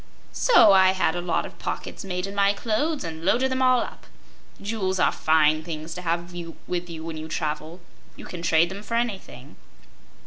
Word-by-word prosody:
So 460 Hz, -, +6 dB
I 190 Hz, -1 st, +6 dB
had 185 Hz, -4 st, +1 dB
a 175 Hz, -, -2 dB
lot 175 Hz, -2 st, -1 dB
of -, -, -11 dB
pockets -, -, -5 dB
made 180 Hz, -1 st, -3 dB
in 195 Hz, -, -6 dB
my 200 Hz, 0 st, +3 dB
clothes 255 Hz, +9 st, -1 dB
and 160 Hz, -1 st, -6 dB
loaded 250 Hz, +8 st, +2 dB
them 260 Hz, 0 st, -1 dB
all 255 Hz, -1 st, +4 dB
up. -, -, -8 dB, 0.5 s
Jewels 200 Hz, -3 st, -2 dB
are -, -, +4 dB
fine 155 Hz, 0 st, +3 dB
things 160 Hz, 0 st, -6 dB
to 180 Hz, -, -7 dB
have 170 Hz, 0 st, -2 dB, 0.3 s
with 175 Hz, -1 st, -3 dB
you 160 Hz, -1 st, -7 dB
when 165 Hz, -1 st, -5 dB
you 155 Hz, 0 st, -6 dB
travel; 155 Hz, +2 st, -4 dB, 0.4 s
you -, -, -11 dB
can 175 Hz, -, -7 dB
trade 170 Hz, 0 st, +3 dB
them 195 Hz, +1 st, -7 dB
for 230 Hz, +2 st, -4 dB
anything." 195 Hz, -, -4 dB
180 Hz, 195 wpm, -25 LUFS, 160-205 Hz, 0.5 s, So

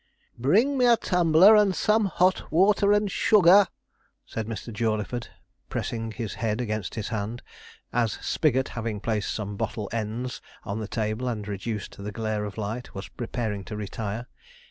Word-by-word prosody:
'Bring 220 Hz, -, +2 dB
me 250 Hz, -, +5 dB
a 235 Hz, -1 st, +6 dB
tumbler 180 Hz, +3 st, +5 dB
and 205 Hz, -3 st, +4 dB
some 215 Hz, 0 st, +3 dB
hot 185 Hz, -1 st, +1 dB
water 200 Hz, +4 st, +4 dB
and 205 Hz, -1 st, +2 dB
sugar,' 200 Hz, -1 st, +6 dB, 0.6 s
said 110 Hz, -1 st, -5 dB
Mr. 115 Hz, +1 st, -6 dB
Jawleyford, 110 Hz, +2 st, -1 dB, 0.4 s
pressing 115 Hz, -1 st, -3 dB
his 115 Hz, -3 st, -4 dB
head 110 Hz, -1 st, 0 dB
against 110 Hz, -5 st, -3 dB
his 110 Hz, -3 st, -3 dB
hand, 110 Hz, +2 st, -4 dB, 0.5 s
as 115 Hz, -3 st, +1 dB
Spigot, 130 Hz, -4 st, 0 dB
having 115 Hz, -3 st, -4 dB
placed 105 Hz, -1 st, -1 dB
some 105 Hz, -2 st, -4 dB
bottle 105 Hz, -1 st, -3 dB
ends 115 Hz, +3 st, -3 dB, 0.2 s
on 105 Hz, +1 st, -4 dB
the 110 Hz, -, -4 dB
table, 110 Hz, +3 st, -2 dB
and 105 Hz, -4 st, -3 dB
reduced 105 Hz, +1 st, -4 dB
the 105 Hz, -, -4 dB
glare 110 Hz, 0 st, -2 dB
of 105 Hz, +1 st, -7 dB
light, 110 Hz, +3 st, -5 dB
was 95 Hz, -, -6 dB
preparing 110 Hz, -4 st, -4 dB
to 105 Hz, -, -6 dB
retire. 105 Hz, +2 st, -4 dB
115 Hz, 160 wpm, -26 LUFS, 105-165 Hz, 0.6 s, a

